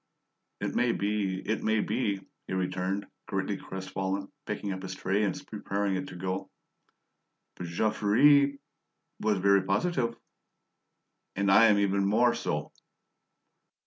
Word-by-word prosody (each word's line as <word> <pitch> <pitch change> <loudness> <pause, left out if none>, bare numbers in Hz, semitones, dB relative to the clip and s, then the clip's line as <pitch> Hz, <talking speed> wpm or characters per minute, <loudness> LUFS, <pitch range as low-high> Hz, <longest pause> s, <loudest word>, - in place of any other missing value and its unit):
"It - - -2
may 120 -1 +2
be, 100 -2 -1
it 110 +2 -1
may 110 0 +2
be," 100 -4 -1 0.2
he - - -4
returned, 95 +2 -1 0.2
greatly 95 +1 -1
crestfallen, 95 +1 -4 0.2
picking 105 -1 -3
up 95 - -6
his 95 0 -6
tray 95 +2 0
and 105 - 0
preparing 100 -2 -2
to 90 - -9
go. 95 +1 -3 1.1
"But 90 - -6
Jean 95 +6 +1
Ferret 140 +6 +4 0.6
was 105 -2 +1
very 100 +1 +4
positive." 115 - 0 1.2
"And 100 0 +2
I 115 +4 +8
am 105 -2 +5
even 100 -1 +2
more 115 +5 +4
so!" - - -3
100 Hz, 130 wpm, -29 LUFS, 95-110 Hz, 1.2 s, I